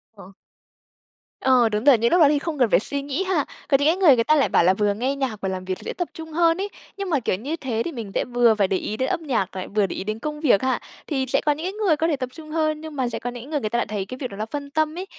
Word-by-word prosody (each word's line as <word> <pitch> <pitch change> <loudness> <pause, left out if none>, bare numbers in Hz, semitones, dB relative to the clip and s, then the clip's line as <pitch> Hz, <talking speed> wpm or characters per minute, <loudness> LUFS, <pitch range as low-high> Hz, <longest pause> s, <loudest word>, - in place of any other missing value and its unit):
Ờ. 195 -2 -13 1.1
Ờ, 250 -3 +4
đúng 210 0 -2
rồi, 275 -3 +7
những 230 +1 +1
lúc 350 - +5
đó 300 - +8
thì 290 -1 +2
không 310 -2 -4
cần 245 -3 +4
phải - - +5
suy 280 +7 -2
nghĩ 285 +6 -2
ha. 370 -7 0 0.2
Còn 275 - +4
những 285 - +2
cái 335 - +3
người 340 -8 +6
người 230 - +2
ta 310 +6 +3
lại 280 - +3
bảo - - +4
là 185 +2 +5
vừa 205 +1 +1
nghe 255 +7 -1
nhạc, 260 -7 -3
vừa 190 - -1
làm 185 -1 -4
việc 185 0 -3
dễ - - -5
tập 350 - -3
trung 320 0 -9
hơn 330 +1 +3
ấy. 405 - -2 0.3
Nhưng 395 -2 -4
mà, 300 -5 +2
kiểu, 215 -6 0
như 275 - -4
thế 250 -8 -3
thì 345 - -3
mình 230 -8 -7
sẽ - - +1
vừa 240 -2 +3
phải 200 -2 +2
để 190 - 0
ý 215 +3 -4
đến 260 +2 0
âm 335 -3 -2
nhạc, 235 - 0 0.3
vừa 210 -2 +4
để - - -5
ý - - -4
đến 215 +2 -4
công 300 +4 -4
việc 260 -10 +3
ha. 260 0 +1 0.3
Thì 270 -4 -1
sẽ 270 +2 +1
có 300 - +4
những 305 +3 -3
cái 375 - -2
người 410 -6 +2
có 320 - +1
thể 320 - +1
tập 255 -2 -4
trung 315 -2 -11
hơn, 310 -1 0
nhưng 315 -1 -8
mà 260 -3 0
sẽ - - -4
có 245 - -4
những 245 +2 -9
người 305 -2 0
người 215 - -2
ta 235 - -1
lại - - +1
thấy 205 -2 -3
cái 255 - -8
việc 255 -2 -4
đó 200 - -9
nó 215 - -2
phân 285 +4 -6
tâm 310 +1 0
ấy, 370 - -4
270 Hz, 330 wpm, -23 LUFS, 220-310 Hz, 1.1 s, đó